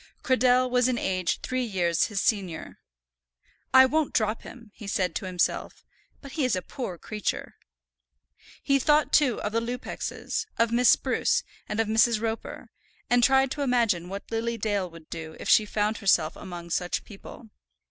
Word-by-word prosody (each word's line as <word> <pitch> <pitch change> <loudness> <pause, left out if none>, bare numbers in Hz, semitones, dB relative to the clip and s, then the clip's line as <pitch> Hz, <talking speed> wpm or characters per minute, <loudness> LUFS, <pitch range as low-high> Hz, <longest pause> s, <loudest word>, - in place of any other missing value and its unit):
Cradell 255 0 +3
was 250 0 +2
in 255 -2 0
age 185 -5 -1
three 255 0 -2
years 175 -7 +1
his 210 -3 -3
senior. 190 -8 -2 0.9
"I 260 0 +8
won't 305 +2 0
drop 215 0 +1
him," 230 -4 -12
he 215 - -10
said 185 -2 0
to 190 - -4
himself; 180 -1 -2 0.4
"but 275 - -10
he 305 - -2
is 255 -5 +2
a 185 - -3
poor 215 -10 -6
creature." 210 +2 -4 1.1
He 275 0 +3
thought, 300 +2 +2
too, 270 -6 +3
of 210 - -2
the 230 - +1
Lupexes, 245 +2 -4
of 230 0 +2
Miss 245 +1 +4
Spruce, - - +2 0.3
and 210 - -3
of 225 - +2
Mrs. 220 +1 +3
Roper, 225 0 -5 0.4
and 245 0 +4
tried 265 0 +4
to 290 - -3
imagine 230 -10 +1
what 200 +3 -7
Lily 230 +1 -1
Dale 205 -4 -1
would 165 -2 -14
do 160 -1 -7
if - - -7
she 215 - +5
found 210 +1 0
herself 170 -6 +2
among 175 -3 -9
such 180 +1 -1
people. 215 +2 -12
225 Hz, 170 wpm, -26 LUFS, 190-250 Hz, 1.1 s, I